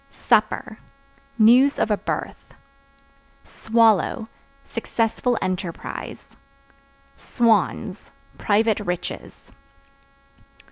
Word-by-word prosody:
Supper 215 +1 0 0.6
News 245 +5 +5
of 215 - 0
a - - +4
birth. - - -6 0.9
Swallow 225 -1 +1 0.4
Successful 230 +1 -1
enterprise. 185 -2 -6 0.8
Swans 230 -4 0 0.3
Private 215 +1 +1
riches. 180 -4 -6
220 Hz, 60 wpm, -22 LUFS, 205-230 Hz, 0.9 s, News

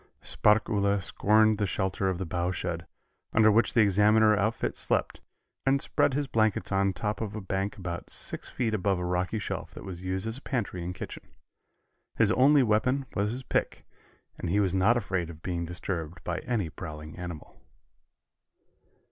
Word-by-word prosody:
Sparkuhle 105 -2 +2
scorned 110 +4 +3
the 105 - +1
shelter 95 +1 -1
of 95 - -1
the 95 - -3
bough 85 +1 -1
shed, 90 -2 -3 0.5
under 110 -1 +6
which 115 +5 +2
the 115 - +6
Examiner 105 +2 +5
outfit 110 +2 -1
slept, - - 0 0.4
and 135 +1 +3
spread 135 - +1
his 145 0 0
blankets 110 -6 +1
on 95 0 +2
top 105 +3 -3
of 110 -1 -4
a - - -3
bank 95 0 -3
about 85 -3 -5
six - - -4
feet 115 -3 -1
above 100 -2 +1
a 90 - -3
rocky 90 +4 -1
shelf 105 - -5
that - - -8
was 90 -3 -7
used 95 +1 -2
as 115 +3 -3
a - - -26
pantry 105 -11 -3
and 90 +1 -4
kitchen. - - -8 0.9
His 110 -2 +3
only 135 +4 +5
weapon 125 +5 +1
was 105 +1 0
his 130 +3 -5
pick, - - -2 0.5
and 90 - -3
he 100 +4 +2
was 95 -3 +2
not 100 +6 +4
afraid 95 -6 -2
of 80 -1 -11
being 85 -2 -2
disturbed 85 -2 -5
by 90 0 -2
any 105 -9 -2
prowling 75 +1 -8
animal. 85 -4 -8
100 Hz, 175 wpm, -28 LUFS, 90-110 Hz, 0.9 s, under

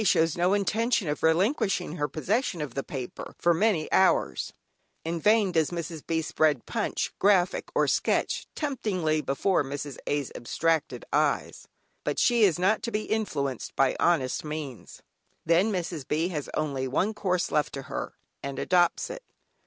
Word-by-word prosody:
shows 165 -5 +3
no 180 +3 +2
intention 220 0 +1
of 150 - -2
relinquishing 180 - +1
her 145 - 0
possession 185 - -1
of 150 -5 -4
the 135 - -2
paper 130 -3 -7
for 175 - +3
many 170 -3 +2
hours. 65 - +2 0.5
In 165 +1 -2
vain 210 +1 +4
does 160 -3 +2
Mrs. 170 -2 -5
B. 160 -1 0
spread 150 -5 +1
"Punch," - - -2
"Graphic," 190 -3 +3
or - - +3
"Sketch," - - 0
temptingly 190 - -1
before 150 +6 +1
Mrs. 140 0 -6
A's 145 -2 -1
abstracted 160 +6 -1
eyes, - - 0 0.5
she 240 -2 +3
is 185 -6 +4
not 190 +5 +2
to - - -3
be 210 0 -1
influenced 145 - -2
by 135 -1 +3
honest 145 -7 +1
means. 150 -5 -7 0.4
Then 175 +6 +3
Mrs. 170 -7 -3
B. 160 +4 0
has 150 -5 -4
only 135 -3 -1
one 185 +11 0
course 185 -4 -1
left 150 - +1
to 135 - -5
her, - - -5 0.3
and 140 -1 -5
adopts 175 - +2
it. - - -7
165 Hz, 155 wpm, -27 LUFS, 150-195 Hz, 0.5 s, vain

